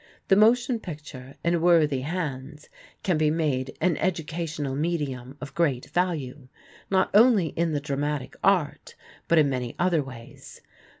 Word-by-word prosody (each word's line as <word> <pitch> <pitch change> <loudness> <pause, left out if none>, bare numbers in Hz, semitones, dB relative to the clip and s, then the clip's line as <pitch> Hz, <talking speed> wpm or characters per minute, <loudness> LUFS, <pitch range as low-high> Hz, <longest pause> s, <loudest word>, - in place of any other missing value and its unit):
The 195 - +6
motion 235 +3 +4
picture, 150 -7 -9
in 170 -1 +1
worthy 160 -6 +3
hands, 150 -2 -5 0.3
can 180 -5 +1
be 155 -1 +3
made 145 -5 -1
an 170 -2 +1
educational 160 -5 -2
medium 140 -4 -3
of 145 - -8
great 140 -7 0
value, 150 -7 -2 0.4
not 190 -1 +2
only 210 -6 +5
in 165 0 -1
the 145 - 0
dramatic 145 -1 -3
art 185 -7 +1 0.3
but 170 - +3
in 155 -2 +5
many 125 -3 -3
other 175 -3 +2
ways. 130 -4 -11
155 Hz, 140 wpm, -26 LUFS, 140-175 Hz, 0.4 s, The